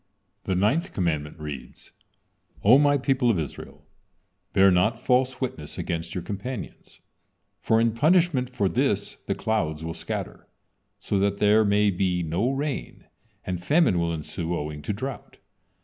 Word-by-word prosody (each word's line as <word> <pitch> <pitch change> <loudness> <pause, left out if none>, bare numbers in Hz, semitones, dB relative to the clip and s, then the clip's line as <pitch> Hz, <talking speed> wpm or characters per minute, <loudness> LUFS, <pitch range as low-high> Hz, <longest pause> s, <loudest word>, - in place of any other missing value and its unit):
The 95 - 0
ninth 150 - +1
commandment 75 -5 -1
reads: 75 -4 -9 0.7
"O 120 +7 +7
My 145 -1 +4
people 130 -2 +1
of 110 - +2
Israel, 80 -4 -7 0.7
bear 95 0 +5
not 105 +6 +2
false 130 0 +1
witness 80 - -5
against 85 +4 -4
your 90 - -3
companions, 105 +6 -7 0.6
for 110 - +2
in 115 0 +3
punishment 150 0 +2
for 105 -6 0
this 85 - 0
the - - 0
clouds 80 -8 -1
will 80 - -4
scatter, 85 - -6 0.5
so 100 0 -1
that 100 0 +1
there 105 +2 +4
may 105 0 +3
be 90 -1 0
no 85 +9 0
rain, 140 +1 -4 0.4
and 90 -1 -4
famine 145 - +3
will 85 0 0
ensue 85 +2 -3
owing 75 -1 -5
to 105 - -3
drought." 130 +6 -6
100 Hz, 150 wpm, -25 LUFS, 85-125 Hz, 0.7 s, O